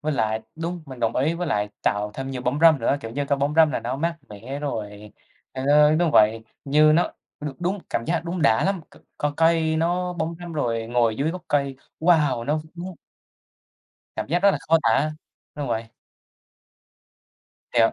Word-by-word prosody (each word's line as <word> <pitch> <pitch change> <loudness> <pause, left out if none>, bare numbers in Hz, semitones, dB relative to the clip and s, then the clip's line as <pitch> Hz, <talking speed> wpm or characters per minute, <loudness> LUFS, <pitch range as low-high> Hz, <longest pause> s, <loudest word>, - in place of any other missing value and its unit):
với 155 0 -1
lại 110 -3 0 0.2
đúng, 170 +1 -4
mình 130 -2 -10
đồng 115 0 0
ý 150 +6 +1
với 175 +1 -3
lại 105 -7 0
tạo 105 +1 0
thêm 135 0 -5
nhiều 125 -2 -5
bóng 130 +4 0
râm 165 -3 +7
nữa, 125 - +2
kiểu 115 -4 -7
như, 140 +4 -2
cái 140 - +1
bóng 145 +2 0
râm 160 -1 +6
là - - -2
nó 125 +3 -3
mát 165 +3 -1
mẻ 115 +7 -7
rồi 105 -6 -5 0.4
ê, 130 - -5
tới 150 +1 +5
đúng 170 -1 +2
vậy, 110 +1 +4 0.2
như 150 +2 +5
nó 170 +3 +2 0.3
được 145 -2 -5
đúng 185 +4 -1
cảm 115 - -1
giác 170 0 -1
đúng 170 -1 -3
đã 110 -5 +4
lắm, 195 -2 0
c - - -20 0.2
co 145 0 -1
cây 165 -1 +3
nó 180 +2 0
bóng 165 -1 -3
râm 175 -1 -7
rồi 115 -7 -1
ngồi 115 -2 +1
dưới 145 +5 0
gốc 180 0 -7
cây, 140 -2 0 0.2
wow! 150 -8 +3
Nó 150 +3 0
vũng 180 +2 -7 1.2
Cảm - - -3
giác 170 +4 +2
rất 200 - +7
là - - -1
khó 165 - +5
tả, 145 +7 +2 0.4
đúng 145 -3 -4
vậy. 115 0 -1 1.9
Thiệt 115 -1 +4
145 Hz, 200 wpm, -24 LUFS, 120-165 Hz, 1.9 s, râm